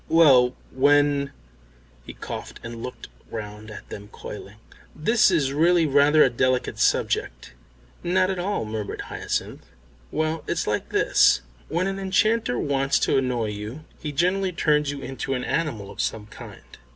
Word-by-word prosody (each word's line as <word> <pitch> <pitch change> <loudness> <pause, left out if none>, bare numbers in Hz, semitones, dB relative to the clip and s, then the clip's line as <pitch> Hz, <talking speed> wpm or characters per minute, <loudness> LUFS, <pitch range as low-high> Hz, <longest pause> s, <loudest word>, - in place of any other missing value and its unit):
"Well, 135 -7 +6 0.2
when 145 +1 +3 0.4
" - - -30
He - - -7
coughed - - -7
and 115 0 -7
looked 125 - -7 0.2
round 105 -1 -7
at 110 - -10
them 100 0 -8
coyly. 105 0 -9 0.4
"This 225 +9 +3
is 150 -7 +1
really 170 +3 +4
rather 145 +1 +5
a - - +4
delicate 130 +1 0
subject." - - 0 0.5
"Not 185 +2 +2
at 185 - -3
all," 190 - -1
murmured 105 -1 -4
Hyacinth. - - -4 0.4
"Well, 155 0 -1
it's - - -1
like - - -2
this. 65 - +4 0.3
When 170 +4 0
an 195 0 -2
enchanter 195 - +1
wants 135 0 +1
to - - +2
annoy 125 -4 -1
you 105 +9 -7
he 150 - -4
generally 185 +5 +1
turns 150 -3 +2
you 140 -1 -4
into 135 +1 -3
an 125 - -3
animal 115 -12 -2
of - - -4
some 110 -2 -2
kind." 105 - -13
140 Hz, 155 wpm, -24 LUFS, 110-165 Hz, 0.5 s, Well